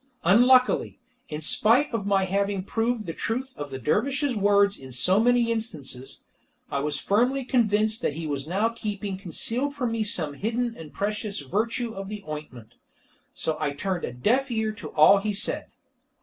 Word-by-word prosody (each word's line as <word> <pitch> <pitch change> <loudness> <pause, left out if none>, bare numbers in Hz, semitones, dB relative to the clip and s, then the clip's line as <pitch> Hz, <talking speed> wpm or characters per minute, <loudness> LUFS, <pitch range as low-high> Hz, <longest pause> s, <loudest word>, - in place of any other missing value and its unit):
Unluckily, 250 +7 +4 0.3
in 150 -1 -5
spite 230 - +3
of 200 -3 -2
my 195 -1 +3
having 200 0 -1
proved 225 +2 -1
the 165 - -4
truth 255 +8 -3
of 145 - -6
the 135 - -5
dervish's 260 - 0
words 200 0 +3
in 130 -1 -11
so 180 - +3
many 240 0 +3
instances, 150 - -5 0.5
I 140 - 0
was 145 0 -1
firmly 250 +6 +1
convinced 215 -2 +2
that 145 - -1
he 165 0 -5
was 145 -1 -2
now 200 +6 +1
keeping 210 -3 -4
concealed 230 - -1
from 250 -5 -1
me 225 -1 0
some 165 -8 -1
hidden 230 +7 -2
and 160 -6 -10
precious 205 -2 -2
virtue 225 - -2
of 195 -1 -7
the 210 -1 -6
ointment. 135 -7 -8 0.6
So 160 - -2
I 150 -2 -1
turned 185 +4 -3
a - - -3
deaf 240 - +1
ear 220 -2 -1
to 215 - -8
all 155 +6 +7
he 210 +1 -2
said. 200 - -2
205 Hz, 175 wpm, -26 LUFS, 160-230 Hz, 0.6 s, all